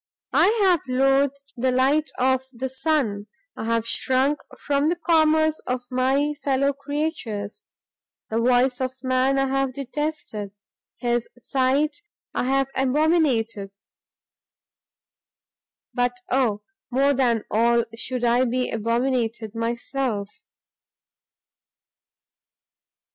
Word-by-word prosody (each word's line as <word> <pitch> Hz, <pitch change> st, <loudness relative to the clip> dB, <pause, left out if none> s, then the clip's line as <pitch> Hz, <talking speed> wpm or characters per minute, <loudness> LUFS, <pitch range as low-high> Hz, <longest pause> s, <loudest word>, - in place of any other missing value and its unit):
I -, -, +5 dB, 0.2 s
have 360 Hz, -5 st, +4 dB
loathed 270 Hz, +2 st, +1 dB
the 255 Hz, +1 st, +1 dB
light 275 Hz, +5 st, +2 dB
of 260 Hz, 0 st, +2 dB
the 260 Hz, +1 st, -4 dB
sun, 260 Hz, -7 st, -1 dB, 0.3 s
I -, -, -5 dB
have 230 Hz, 0 st, 0 dB
shrunk 265 Hz, +5 st, +1 dB, 0.2 s
from 285 Hz, +1 st, +1 dB
the 345 Hz, -, +1 dB
commerce 315 Hz, -2 st, +3 dB
of 250 Hz, 0 st, -2 dB
my 270 Hz, +4 st, +1 dB
fellow 275 Hz, 0 st, +2 dB
creatures; 280 Hz, -, -4 dB, 0.6 s
the 225 Hz, -, +1 dB
voice 250 Hz, +2 st, +3 dB
of 260 Hz, 0 st, -2 dB
man 260 Hz, +1 st, +2 dB
I 270 Hz, -, +2 dB
have 270 Hz, -1 st, -1 dB
detested, 275 Hz, -7 st, -4 dB, 0.4 s
his 240 Hz, -1 st, -1 dB
sight 275 Hz, -, 0 dB, 0.3 s
I -, -, -1 dB
have 270 Hz, +1 st, +1 dB
abominated! 260 Hz, -, +1 dB, 2.2 s
but 245 Hz, -1 st, 0 dB
oh, 235 Hz, -6 st, +1 dB, 0.3 s
more 275 Hz, +3 st, +3 dB
than 240 Hz, -5 st, +1 dB
all 235 Hz, +1 st, +3 dB
should 250 Hz, +1 st, -4 dB
I 240 Hz, +1 st, +3 dB
be 250 Hz, +1 st, -1 dB
abominated 230 Hz, -1 st, -1 dB
myself! 230 Hz, -2 st, -2 dB
260 Hz, 105 wpm, -24 LUFS, 235-280 Hz, 2.2 s, I